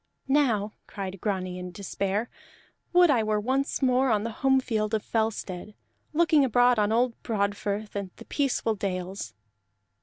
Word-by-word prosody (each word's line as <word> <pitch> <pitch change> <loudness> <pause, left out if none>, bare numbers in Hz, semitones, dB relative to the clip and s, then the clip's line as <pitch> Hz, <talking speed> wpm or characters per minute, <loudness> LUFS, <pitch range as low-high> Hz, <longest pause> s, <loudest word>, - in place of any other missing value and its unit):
"Now," 240 -7 +2 0.2
cried 195 -2 -6
Grani 185 -3 -2
in 180 0 -6
despair, 200 +3 -2 0.6
"would 355 -2 +6
I 245 -5 +3
were 215 -1 +1
once 265 +5 -1
more 260 +1 +3
on 210 -2 +2
the 230 - -3
home 265 0 +4
field 220 -4 -1
of 215 - -2
Fellstead, 215 -3 -2 0.4
looking 315 -2 +4
abroad 245 -1 +4
on 210 0 +2
old 235 +1 +1
Broadfirth 205 0 -2
and 200 -2 -3
the - - -12
peaceful 270 -5 0
dales!" 185 - -4
215 Hz, 150 wpm, -27 LUFS, 200-255 Hz, 0.6 s, would